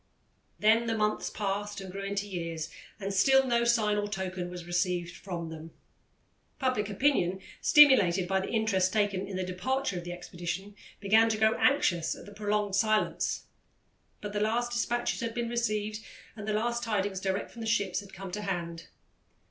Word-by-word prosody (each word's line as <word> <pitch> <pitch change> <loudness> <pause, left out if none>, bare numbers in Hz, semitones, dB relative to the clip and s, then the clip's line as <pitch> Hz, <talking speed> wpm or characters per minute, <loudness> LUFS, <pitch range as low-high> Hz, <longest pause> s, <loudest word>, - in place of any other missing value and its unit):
Then 225 +2 +4
the 225 0 0
months 210 0 0
passed 205 0 -3
and 190 -1 -7
grew 195 +1 -6
into 200 +1 -2
years, 165 -4 -4 0.3
and 195 0 -3
still 265 +7 +5
no 235 -2 +2
sign 220 -3 +2
or 205 0 -1
token 185 -3 -4
was 175 -1 -8
received 175 0 -1
from 170 -3 -5
them. 160 0 -8 0.9
Public 255 -6 0
opinion, 195 -5 +1 0.2
stimulated 200 -12 +6
by 190 +1 +2
the 190 - -4
interest 200 -5 +1
taken 200 -2 0
in 195 -1 -5
the 185 - -1
departure 195 +3 -1
of - - -8
the 175 - -6
expedition, 175 +3 -5 0.3
began 220 +3 +4
to 220 - 0
grow 220 0 +4
anxious 175 - +2
at - - -12
the 205 - -11
prolonged 210 -1 -1
silence; 215 +1 +1 0.8
but 205 -1 -5
the 205 - 0
last 235 +3 0
despatches 240 0 -1
had 230 0 -3
been 235 -1 -1
received 215 -3 -1 0.4
and 210 -2 -8
the 215 - 0
last 235 +3 0
tidings 205 -4 -1
direct 190 +1 -2
from 235 - -10
the 225 - -4
ships 205 -5 +1
had 200 -1 -11
come 190 0 -8
to 210 - -4
hand. 170 -4 -4
205 Hz, 180 wpm, -29 LUFS, 185-225 Hz, 0.9 s, stimulated